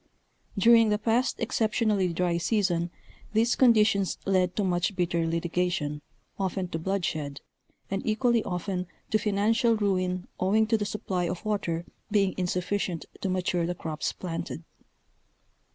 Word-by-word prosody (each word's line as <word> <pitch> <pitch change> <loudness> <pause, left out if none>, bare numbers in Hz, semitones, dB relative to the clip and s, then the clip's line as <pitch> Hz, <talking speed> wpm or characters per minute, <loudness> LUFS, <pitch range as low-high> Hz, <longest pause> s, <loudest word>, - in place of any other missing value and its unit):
During 230 +2 +6
the 210 - +2
past 225 +4 +1
exceptionally 215 -4 +1
dry 170 0 0
season 175 -3 +1 0.4
these 230 +2 +3
conditions 215 -6 +4
led 185 -2 +2
to 210 - 0
much 180 +1 0
bitter 170 -2 0
litigation, 165 -3 -1 0.4
often 190 -1 -1
to 165 - -3
bloodshed, 160 -6 -2 0.5
and 195 - -1
equally 230 +1 +2
often 180 0 -3 0.2
to 215 - +3
financial 225 +3 +2
ruin 185 -3 0
owing 210 +4 +3
to 225 - +2
the 205 - -1
Sunny 185 -4 -2
of 180 +4 -5
water 175 -5 -1 0.2
being 200 -3 +2
insufficient 180 -1 -1 0.2
to 195 - -1
mature 180 -2 0
the 175 - -2
crops 160 -3 -3
planted. 165 -2 -5
185 Hz, 135 wpm, -27 LUFS, 175-215 Hz, 0.5 s, During